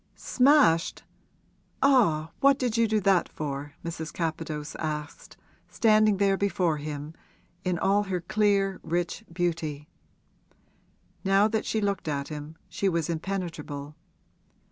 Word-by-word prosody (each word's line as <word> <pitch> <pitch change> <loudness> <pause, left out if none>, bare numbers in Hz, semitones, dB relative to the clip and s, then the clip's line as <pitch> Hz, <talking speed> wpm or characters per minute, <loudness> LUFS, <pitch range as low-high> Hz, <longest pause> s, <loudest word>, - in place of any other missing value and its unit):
'Smashed? 260 - +3 0.8
Ah, 170 - +3
what 275 -1 +5
did 245 -4 -1
you 230 -1 +3
do 215 0 +1
that 190 -2 +3
for?' 145 -1 -5
Mrs. 160 -2 -5
Capadose 155 -2 -4
asked, 150 -2 -5 0.3
standing 215 -2 +3
there 195 0 +2
before 180 -5 +1
him 150 +1 -6 0.5
in 180 -2 0
all 200 +3 +2
her 185 -2 -2
clear, 195 +1 +1
rich 170 +1 -2
beauty. 165 -4 -2 1.4
Now 195 +1 +4
that 220 0 -2
she 220 - 0
looked 200 -4 -1
at 140 -2 -2
him 150 +1 -7
she 195 - -1
was 170 -2 -1
impenetrable. 160 -5 -5
175 Hz, 120 wpm, -27 LUFS, 155-200 Hz, 1.4 s, what